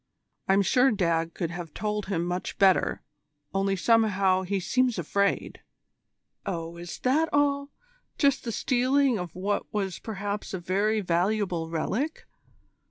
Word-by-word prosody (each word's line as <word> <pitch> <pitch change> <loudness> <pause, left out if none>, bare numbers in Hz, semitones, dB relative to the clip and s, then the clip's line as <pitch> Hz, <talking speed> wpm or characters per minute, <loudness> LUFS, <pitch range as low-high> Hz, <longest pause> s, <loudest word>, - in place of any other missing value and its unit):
I'm 195 +1 +4
sure 250 +7 +4
Dad 165 -5 0
could 170 -2 -2
have 170 -2 -7
told 210 -1 -2
him 175 -4 -1
much 180 +1 -3
better, 195 -3 +3 0.5
only 195 0 +1
somehow 195 -3 +3
he 195 +1 -1
seems 255 +5 +1
afraid." 200 +4 -1 0.8
"Oh, 170 -3 -4
is 175 0 -7
that 305 +6 +2
all 280 -1 +1 0.5
just 280 -3 +2
the 235 - -3
stealing 255 0 +2
of 180 -3 -6
what 200 +3 -2
was 195 -3 -2
perhaps 205 -2 -4
a - - -4
very 200 +5 +1
valuable 175 -1 0
relic? 225 - -2
200 Hz, 135 wpm, -27 LUFS, 180-230 Hz, 0.8 s, I'm